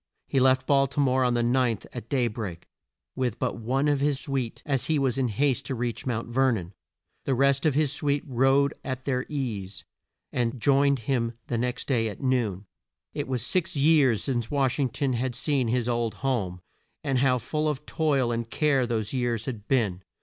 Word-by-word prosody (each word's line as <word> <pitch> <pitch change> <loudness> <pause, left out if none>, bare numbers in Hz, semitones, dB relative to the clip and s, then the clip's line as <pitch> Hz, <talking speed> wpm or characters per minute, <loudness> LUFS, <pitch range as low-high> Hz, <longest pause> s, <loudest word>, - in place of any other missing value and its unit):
He 135 - +1
left 130 0 +4
Bal 140 -1 +4
ti 140 +2 -5
more 130 -2 +3
on 125 -1 +2
the 120 - +1
ninth, 120 -3 +1
at 110 - -7
day 130 -4 +2
break, 105 -7 -6 0.5
with 125 -3 -1
but 130 -2 -2
one 130 +6 0
of 145 -1 +2
his 140 -1 +1
suite, 135 -5 -3
as 135 -4 0
he 160 - +2
was 135 -2 +1
in 130 - +2
haste 130 +4 0
to 135 - -2
reach 120 +1 -3
Mount 115 -2 -2
Ver 130 +2 +2
non. 95 -3 -5 0.5
The 135 - +1
rest 140 +3 +3
of 145 - +1
his 150 -2 +2
suite 145 -1 0
rode 135 +2 +3
at 130 -1 -5
their 130 -2 -1
ease, 105 -10 -4 0.5
and 120 0 -1
joined 140 +1 +3
him 115 -1 0
the 120 - -2
next 125 +1 -2
day 115 -5 +1
at 105 - -8
noon. 120 -8 0 0.5
It - - -3
was 125 -3 -2
six 185 +2 0
years 140 -6 +4
since 120 -5 -1
Wash 135 -2 +1
ing 135 -3 +2
ton 135 +2 -1
had 120 +1 -2
seen 135 -1 0
his 120 0 0
old 120 -2 0
home, 95 -9 -1 0.4
and 135 -2 +1
how 130 -1 +3
full 155 +5 -1
of 150 0 -4
toil 140 -6 +1
and 115 0 -3
care 140 -4 +2
those 110 -2 -2
years 120 -3 -1
had 115 -6 -6
been! 105 -9 +1
130 Hz, 200 wpm, -26 LUFS, 115-140 Hz, 0.5 s, left